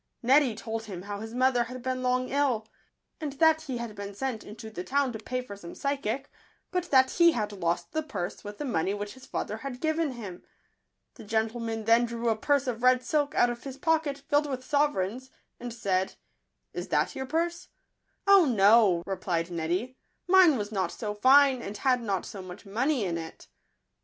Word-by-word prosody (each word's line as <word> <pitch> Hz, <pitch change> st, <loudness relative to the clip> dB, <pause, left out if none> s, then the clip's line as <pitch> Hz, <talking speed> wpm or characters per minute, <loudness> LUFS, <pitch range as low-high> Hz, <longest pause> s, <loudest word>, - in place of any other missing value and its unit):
Neddy 260 Hz, -1 st, +4 dB
told 225 Hz, 0 st, -5 dB
him 185 Hz, -4 st, -7 dB
how 200 Hz, 0 st, -5 dB
his 225 Hz, +2 st, -7 dB
mother 250 Hz, -1 st, +3 dB
had 255 Hz, +1 st, -8 dB
been 255 Hz, 0 st, -2 dB
long 255 Hz, 0 st, +1 dB
ill, 260 Hz, -6 st, +1 dB, 0.5 s
and 300 Hz, -3 st, -4 dB
that 320 Hz, +2 st, +4 dB
he 270 Hz, -6 st, -4 dB
had 235 Hz, -2 st, -5 dB
been 200 Hz, -1 st, -7 dB
sent 255 Hz, -1 st, -3 dB
into 220 Hz, +1 st, -10 dB
the 180 Hz, -4 st, -5 dB
town 275 Hz, +2 st, 0 dB
to 220 Hz, -, -6 dB
pay 255 Hz, +3 st, -3 dB
for 205 Hz, -5 st, -9 dB
some 170 Hz, -4 st, -10 dB
phy 280 Hz, 0 st, -1 dB
sic, 270 Hz, +1 st, -4 dB, 0.4 s
but 360 Hz, -1 st, -1 dB
that 260 Hz, -1 st, +5 dB
he 340 Hz, -1 st, +5 dB
had 210 Hz, -3 st, -2 dB
lost 175 Hz, -3 st, -2 dB
the 315 Hz, -, -1 dB
purse 195 Hz, -, -5 dB
with 205 Hz, 0 st, -8 dB
the 295 Hz, -, -4 dB
money 200 Hz, -, 0 dB
which 205 Hz, 0 st, -5 dB
his 260 Hz, 0 st, -15 dB
father 215 Hz, -, -3 dB
had 250 Hz, +1 st, -6 dB
given 315 Hz, -2 st, 0 dB
him. 200 Hz, -7 st, -8 dB, 0.7 s
The -, -, -12 dB
gentleman 225 Hz, +1 st, -2 dB
then 230 Hz, +2 st, +4 dB
drew 235 Hz, 0 st, -2 dB
a 225 Hz, -, +2 dB
purse 280 Hz, +5 st, +1 dB
of 240 Hz, -3 st, -3 dB
red 255 Hz, 0 st, +4 dB
silk 295 Hz, -1 st, 0 dB
out 245 Hz, -, +4 dB
of 240 Hz, 0 st, -8 dB
his 270 Hz, -1 st, -7 dB
pocket, 315 Hz, -4 st, 0 dB
filled 290 Hz, 0 st, +2 dB
with 255 Hz, -1 st, -4 dB
sovereigns, 260 Hz, -5 st, 0 dB, 0.3 s
and 245 Hz, 0 st, -6 dB
said, 190 Hz, -5 st, -1 dB, 0.3 s
" -, -, -52 dB
Is -, -, -5 dB
that -, -, 0 dB
your 265 Hz, 0 st, -4 dB
purse?" 340 Hz, +4 st, -1 dB, 0.3 s
" -, -, -47 dB
Oh, 395 Hz, -3 st, +7 dB
no," 205 Hz, -, +5 dB
replied 180 Hz, -3 st, -2 dB
Neddy; 175 Hz, +10 st, -2 dB, 0.2 s
" -, -, -49 dB
mine 360 Hz, -6 st, +6 dB
was 210 Hz, -1 st, -4 dB
not 190 Hz, -4 st, -1 dB
so 210 Hz, -2 st, -4 dB
fine, 260 Hz, +4 st, +5 dB
and 205 Hz, -1 st, -6 dB
had 250 Hz, +2 st, +2 dB
not 200 Hz, -5 st, -2 dB
so 200 Hz, -, -8 dB
much 185 Hz, +2 st, -10 dB
money 240 Hz, +4 st, 0 dB
in 170 Hz, -2 st, -2 dB
it." 160 Hz, 0 st, -10 dB
240 Hz, 205 wpm, -28 LUFS, 205-275 Hz, 0.7 s, Oh